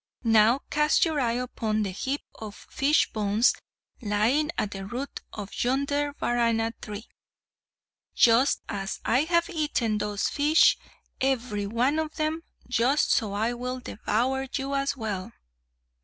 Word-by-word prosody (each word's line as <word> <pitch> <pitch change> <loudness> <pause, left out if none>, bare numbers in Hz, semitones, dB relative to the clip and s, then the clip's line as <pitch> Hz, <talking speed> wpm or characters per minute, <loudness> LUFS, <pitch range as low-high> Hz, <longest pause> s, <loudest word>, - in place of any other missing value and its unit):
Now 225 +3 +4
cast 300 +3 +3
your 315 -3 -1
eye 235 -3 +1
upon 220 -4 -2
the 195 - -3
heap 265 +9 -3
of 215 -2 -9 0.2
fish 290 +3 +2
bones 215 +2 +3 0.5
lying 230 +8 +1
at 210 -1 -1
the 195 -1 -6
root 255 +6 -5
of 205 -2 -7
yonder 280 +3 0
Varana 230 -1 +1
tree. 210 +2 -7 1.1
Just 240 +4 +4
as 195 -1 -4
I 255 +6 +2
have 340 0 +2
eaten 295 - -1
those 205 0 -1
fish, 300 +3 +4 0.4
every 240 -6 0
one 250 +8 +1
of 315 -1 -3
them, 310 +1 -1 0.3
just 250 +4 +2
so 210 -3 +1
I 220 +4 0
will 250 +1 -4
devour 255 +4 -1
you 275 0 -3
as 275 0 0
well!" 205 -5 -4
245 Hz, 140 wpm, -26 LUFS, 215-280 Hz, 1.1 s, Now